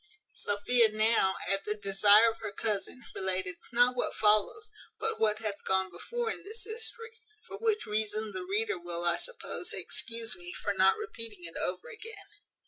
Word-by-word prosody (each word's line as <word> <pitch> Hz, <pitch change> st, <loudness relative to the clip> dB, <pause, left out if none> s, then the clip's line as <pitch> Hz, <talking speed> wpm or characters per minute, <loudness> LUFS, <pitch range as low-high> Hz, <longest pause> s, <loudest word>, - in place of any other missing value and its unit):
Sophia 220 Hz, +3 st, +2 dB
now, 215 Hz, -3 st, +3 dB
at 195 Hz, 0 st, +1 dB
the 210 Hz, -, -1 dB
desire 205 Hz, +2 st, +6 dB
of 225 Hz, -, -13 dB
her -, -, -4 dB
cousin, 215 Hz, +4 st, -1 dB
related 185 Hz, -1 st, -1 dB
not 245 Hz, +1 st, +4 dB
what 245 Hz, -, -1 dB
follows, 215 Hz, -, +3 dB, 0.3 s
but 450 Hz, 0 st, -2 dB
what 215 Hz, -1 st, +3 dB
hath 215 Hz, -2 st, -4 dB
gone 190 Hz, -1 st, +1 dB
before 460 Hz, -, -3 dB
in -, -, -7 dB
this 440 Hz, +3 st, -6 dB
history: 460 Hz, 0 st, -5 dB, 0.3 s
for -, -, -8 dB
which 440 Hz, -2 st, +1 dB
reason 215 Hz, 0 st, -1 dB
the 185 Hz, -2 st, -4 dB
reader 200 Hz, +1 st, -1 dB
will, 175 Hz, 0 st, -3 dB
I 170 Hz, -, +4 dB
suppose, -, -, -4 dB
excuse 230 Hz, -3 st, -2 dB
me 175 Hz, 0 st, -6 dB
for 205 Hz, -, -2 dB
not 190 Hz, 0 st, +4 dB
repeating 230 Hz, -, -6 dB
it 165 Hz, -1 st, -7 dB
over 180 Hz, 0 st, -3 dB
again. 445 Hz, 0 st, -10 dB
215 Hz, 170 wpm, -31 LUFS, 190-250 Hz, 0.3 s, desire